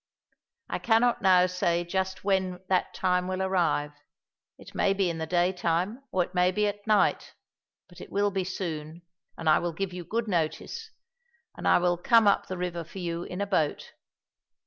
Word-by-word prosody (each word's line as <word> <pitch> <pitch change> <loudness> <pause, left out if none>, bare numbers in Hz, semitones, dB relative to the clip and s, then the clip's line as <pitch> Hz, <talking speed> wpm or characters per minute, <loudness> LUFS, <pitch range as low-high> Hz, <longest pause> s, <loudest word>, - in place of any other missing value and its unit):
I - - -3
cannot 235 +1 +2
now 185 -2 +5
say 175 -1 0
just 190 +2 -3
when 190 -2 0
that 185 - +1
time 180 0 +1
will 185 0 -2
arrive; 175 -6 +1 0.7
it - - -14
may 195 - +2
be 190 -3 +1
in 165 - -6
the 160 - -3
daytime 180 - 0
or 185 - +2
it 180 - -11
may 180 0 +3
be 210 +2 +1
at 205 +1 -4
night, 210 -2 +2 0.5
but - - -15
it - - -11
will 205 0 +1
be 190 -1 -1
soon, 170 -3 -5 0.3
and 165 - -5
I 155 - +6
will 175 -1 -3
give 190 +2 -3
you 180 -1 -6
good 225 +6 -2
notice, 195 - -2 0.7
and - - -4
I - - +6
will 175 -1 +1
come 230 +2 +5
up 200 - +3
the 185 - -5
river 175 -1 -3
for 170 +4 -13
you 170 -1 -3
in 180 +2 -5
a - - +1
boat. 160 -7 -1
180 Hz, 190 wpm, -27 LUFS, 175-195 Hz, 0.7 s, I